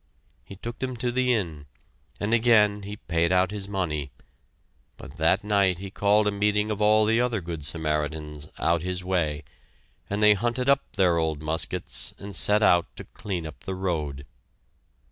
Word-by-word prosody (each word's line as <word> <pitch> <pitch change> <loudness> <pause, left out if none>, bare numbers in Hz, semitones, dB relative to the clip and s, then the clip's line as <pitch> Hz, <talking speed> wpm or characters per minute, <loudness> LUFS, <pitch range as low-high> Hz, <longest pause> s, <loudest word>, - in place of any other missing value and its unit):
He 100 - -11
took 115 +4 -7
them 130 -1 -3
to 120 +1 0
the 125 0 +1
inn, 80 -11 -2 0.5
and 105 +3 -1
again 110 -3 +4
he 100 +1 -7
paid 85 -3 0
out 95 +1 +3
his 100 -2 -4
money, 80 -8 -2 0.9
but 75 - -12
that 80 +6 +2
night 100 -3 +2
he 95 +1 -8
called 105 +1 +2
a - - +2
meeting 105 +1 0
of 105 0 -3
all 110 +1 +4
the 115 +2 +2
other 120 -3 0
good 85 -4 -6
Samaritans 75 -1 -3
"out 85 -1 +1
his 90 +1 -3
way" 80 -5 -1 0.7
and 100 +1 -1
they 105 0 +7
hunted 120 +5 -1
up 140 0 +2
their 90 -4 +2
old 80 -2 -2
muskets 80 +1 -2
and 100 0 -9
set 105 +1 +4
out 85 -5 +4
to - - -8
clean 90 -5 -6
up 80 - -9
the 95 - -5
road. 75 -7 -3
95 Hz, 175 wpm, -25 LUFS, 80-105 Hz, 0.9 s, they